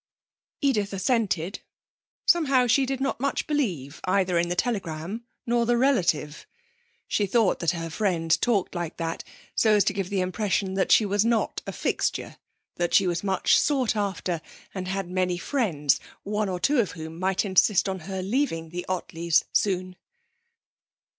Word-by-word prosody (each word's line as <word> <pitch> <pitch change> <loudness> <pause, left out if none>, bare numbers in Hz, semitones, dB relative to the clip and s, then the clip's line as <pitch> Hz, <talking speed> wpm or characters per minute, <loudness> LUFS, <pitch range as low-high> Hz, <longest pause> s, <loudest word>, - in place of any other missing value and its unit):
Edith 215 -9 +1
assented. 195 -4 0 0.7
Somehow 275 -7 +4
she 265 +2 +3
did 270 0 -2
not 275 -2 -1
much 275 +2 -1
believe 180 - -2
either 185 -2 +2
in 170 0 0
the 175 - -1
telegram 195 0 -3 0.2
nor 235 -1 +1
the 240 0 +3
relative. 175 - +1 0.6
She 205 - 0
thought 220 0 +2
that 170 - +1
her 165 -2 -3
friend 165 -3 +1
talked 220 -6 +1
like 175 -2 -4
that 165 -1 -3 0.3
so 220 -1 +3
as 205 - +4
to 200 - 0
give 195 -2 -3
the 200 -2 -1
impression 190 +1 -1
that 190 0 0
she 220 - +6
was 205 +1 +2
not 230 -1 0
a - - -2
fixture; - - -2 0.4
that 175 0 0
she 195 - +5
was 175 0 -1
much 190 -2 +3
sought 265 -7 +1
after 190 -5 -2 0.3
and 185 -2 -4
had 195 0 -2
many 180 0 0
friends, 175 - +1 0.2
one 210 0 -1
or 180 -1 -3
two 280 +9 +2
of 210 - 0
whom 160 -1 -8
might 190 +2 +1
insist 195 +1 +3
on 190 -1 -3
her 190 -1 -3
leaving 195 - -1
the 175 +2 -6
Ottleys 170 -3 +1
soon. 185 -2 0
190 Hz, 165 wpm, -26 LUFS, 175-225 Hz, 0.7 s, she